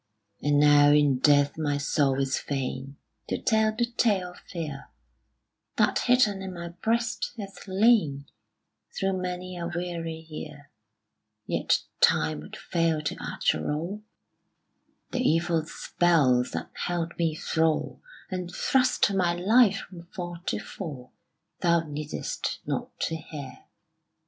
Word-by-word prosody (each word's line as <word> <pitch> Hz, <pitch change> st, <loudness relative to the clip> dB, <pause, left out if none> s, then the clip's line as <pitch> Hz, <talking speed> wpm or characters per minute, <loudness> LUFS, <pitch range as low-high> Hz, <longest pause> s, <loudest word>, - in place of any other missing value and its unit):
And 145 Hz, 0 st, +3 dB
now 145 Hz, 0 st, +7 dB
in 145 Hz, -3 st, +4 dB
death 145 Hz, +2 st, +4 dB
my 145 Hz, -2 st, 0 dB
soul 140 Hz, -1 st, +1 dB
is 135 Hz, -1 st, +1 dB
fain 135 Hz, 0 st, -4 dB, 0.3 s
To -, -, -1 dB
tell 220 Hz, -1 st, +3 dB
the 240 Hz, -, +3 dB
tale 210 Hz, -6 st, +1 dB
of 180 Hz, -, -15 dB
fear 155 Hz, -6 st, -5 dB, 0.9 s
That -, -, +3 dB
hidden 230 Hz, -6 st, +3 dB
in 190 Hz, -1 st, -6 dB
my 170 Hz, 0 st, -6 dB
breast 225 Hz, +7 st, -1 dB
hath 200 Hz, -1 st, -8 dB
lain 190 Hz, -8 st, +3 dB, 0.7 s
Through 195 Hz, -1 st, 0 dB
many 180 Hz, 0 st, -4 dB
a 170 Hz, -, -3 dB
weary 170 Hz, -2 st, -4 dB
year: 150 Hz, -2 st, -9 dB, 0.7 s
Yet -, -, +1 dB, 0.2 s
time 75 Hz, -1 st, +3 dB
would 75 Hz, -, -10 dB
fail 165 Hz, -3 st, 0 dB
to 145 Hz, -, -2 dB
utter -, -, -1 dB
all 170 Hz, +8 st, -3 dB, 1.1 s
The -, -, -1 dB
evil 165 Hz, -5 st, +1 dB
spells 135 Hz, -11 st, +2 dB
that -, -, -4 dB
held 170 Hz, -1 st, -3 dB
me 165 Hz, -2 st, +1 dB
thrall, 160 Hz, 0 st, 0 dB, 0.3 s
And 180 Hz, -1 st, -4 dB
thrust 255 Hz, -4 st, +2 dB
my 180 Hz, -3 st, +2 dB
life 205 Hz, +3 st, +4 dB
from 175 Hz, -2 st, -12 dB
fall 175 Hz, -2 st, -6 dB
to -, -, 0 dB
fall, 140 Hz, -9 st, -8 dB, 0.5 s
Thou 170 Hz, -1 st, +3 dB
needest 150 Hz, -1 st, -4 dB
not -, -, -4 dB
to 160 Hz, -, -1 dB
hear. 150 Hz, -3 st, -9 dB
170 Hz, 130 wpm, -27 LUFS, 145-185 Hz, 1.1 s, now